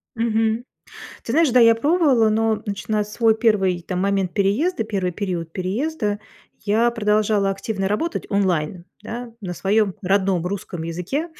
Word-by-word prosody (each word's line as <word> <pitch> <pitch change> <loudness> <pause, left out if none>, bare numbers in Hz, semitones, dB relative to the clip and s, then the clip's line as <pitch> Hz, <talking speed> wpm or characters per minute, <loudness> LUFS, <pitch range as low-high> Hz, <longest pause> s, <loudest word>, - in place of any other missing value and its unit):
Мгм. 225 0 0 0.6
Ты - - -3
знаешь, 325 -3 +4
да, 250 +1 +5
я 230 -1 +7
пробовала, 280 -3 +3
но 220 0 +1
начинать 210 +1 -2
свой 220 +1 +2
первый, 195 -6 +2
там, 180 +1 -3
момент 195 -2 0
переезда, 225 - +1
первый 190 -4 -2
период 175 -4 -4
переезда, 205 - -2 0.4
я 225 +3 +3
продолжала 210 -3 +1
активно 195 0 -3
работать 325 +12 -2
онлайн, 180 -4 0 0.2
да, 235 +2 -7
на 180 -4 -5
своем 200 +1 +1
родном 190 -2 +1
русском 180 -3 -5
языке. 180 - -3
210 Hz, 140 wpm, -22 LUFS, 190-230 Hz, 0.6 s, я